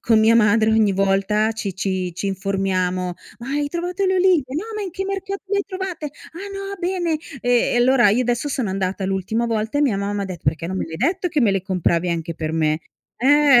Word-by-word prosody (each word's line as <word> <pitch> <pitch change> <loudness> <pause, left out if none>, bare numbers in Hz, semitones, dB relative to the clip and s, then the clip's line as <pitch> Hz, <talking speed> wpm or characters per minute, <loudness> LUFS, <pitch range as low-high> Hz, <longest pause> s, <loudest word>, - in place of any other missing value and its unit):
con 225 -1 +3
mia 220 +1 +5
madre 220 0 +4
ogni 220 -2 +3
volta 195 +3 +2
ci 205 -4 -4
ci 185 -2 -2
ci 200 - -3
informiamo: 185 -2 -1 0.2
"Ma 240 +2 -8
hai 290 +1 -1
trovato 355 +4 -2
le 375 - +2
olive? 365 -5 +4
No, 340 +7 -2
ma 425 - -3
in 380 - -4
che 385 +3 -4
mercato 390 0 -4
le 400 +1 0
hai 400 - -1
trovate? 375 -5 -4
Ah, 335 +6 -10
no, 395 0 -5
bene". 350 -3 0 0.2
Ehm, 245 -1 +2
e - - +2
allora 240 -2 +5
io 230 +5 +3
adesso 245 +3 -1
sono 255 -8 -1
andata 190 0 -2
l'ultima 195 +4 -1
volta 220 +2 -1
e - - +3
mia 245 -9 +2
mamma 200 0 -2
ha - - -2
detto: 185 -4 -7
"Perché 165 +1 0
non 190 +2 -3
me - - -1
l'hai 160 0 -7
detto, 360 - 0
che 300 -3 0
me 220 - +4
le 195 - 0
compravi 180 -2 0
anche 165 0 -3
per 155 -1 -3
me?" 155 0 +1 0.4
eh. 280 0 +6
225 Hz, 230 wpm, -21 LUFS, 190-315 Hz, 0.4 s, eh